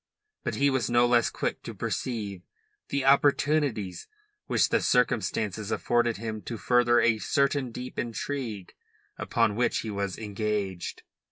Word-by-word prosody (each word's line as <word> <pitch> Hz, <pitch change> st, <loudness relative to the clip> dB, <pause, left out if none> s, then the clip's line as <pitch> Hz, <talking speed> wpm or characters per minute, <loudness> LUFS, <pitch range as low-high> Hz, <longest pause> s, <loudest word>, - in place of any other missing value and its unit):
But -, -, -2 dB
he 140 Hz, 0 st, +3 dB
was 130 Hz, -3 st, 0 dB
no 120 Hz, 0 st, +4 dB
less 120 Hz, -1 st, +3 dB
quick -, -, -3 dB
to -, -, -8 dB
perceive 105 Hz, -7 st, -3 dB, 0.5 s
the 140 Hz, -1 st, -1 dB
opportunities 140 Hz, -, +2 dB, 0.4 s
which -, -, +2 dB
the -, -, +2 dB
circumstances 110 Hz, -4 st, +1 dB
afforded 120 Hz, -1 st, +1 dB
him 110 Hz, 0 st, -5 dB
to 115 Hz, -, -6 dB
further 120 Hz, +1 st, +3 dB
a 115 Hz, -2 st, +3 dB
certain 140 Hz, 0 st, +1 dB
deep 125 Hz, +2 st, -6 dB
intrigue 115 Hz, -4 st, -4 dB, 0.5 s
upon 105 Hz, -, +1 dB
which 120 Hz, +2 st, +1 dB
he 110 Hz, -, -5 dB
was 100 Hz, -2 st, -3 dB
engaged. 105 Hz, -3 st, -3 dB
115 Hz, 140 wpm, -27 LUFS, 105-125 Hz, 0.5 s, no